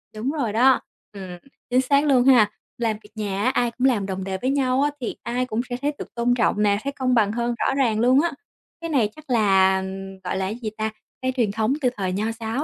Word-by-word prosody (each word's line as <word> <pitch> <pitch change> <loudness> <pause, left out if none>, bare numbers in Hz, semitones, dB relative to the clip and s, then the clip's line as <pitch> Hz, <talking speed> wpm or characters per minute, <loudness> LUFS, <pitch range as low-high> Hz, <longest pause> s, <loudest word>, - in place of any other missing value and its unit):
Đúng 235 +6 -2
rồi 265 -9 -2
đó, 255 +4 +5 0.3
ừm, 200 -2 -9 0.5
chính 250 +1 +3
xác 280 +3 +2
luôn 255 -3 +4
ha. 245 -6 +6 0.3
Làm 225 -3 -1
việc 210 - -16
nhà 205 -2 -2
á, 255 - +3
ai 240 -2 +1
cũng 255 +3 +1
làm 210 -7 +1
đồng 190 -1 -4
đề 190 0 -3
với 260 - 0
nhau 265 -1 +1
á 290 - +3
thì 240 - -3
ai 250 +1 -1
cũng 235 -1 -2
sẽ 245 - -2
thấy 290 +1 +1
được - - -9
tôn 240 +1 +2
trọng 210 -3 +1
nè, 200 -1 +3
thấy 280 0 -3
công 255 -2 0
bằng 215 -4 +3
hơn 235 +1 -1
rõ 270 - +1
ràng 235 -6 +1
luôn 255 +4 +5
á. 340 0 0 0.5
Cái 335 - -4
này 250 -9 +2
chắc 310 -3 -15
là, 190 -4 +4 0.4
gọi 180 - -2
là, 190 - -1
cái 205 +4 -3
gì 220 - -2
ta, 215 0 -1 0.3
cái 260 0 0
truyền 225 -5 +2
thống 220 +5 0
từ 250 - +3
thời 190 -2 -1
nho 205 +3 -1
giáo 230 +5 -2
235 Hz, 250 wpm, -23 LUFS, 210-260 Hz, 0.5 s, ha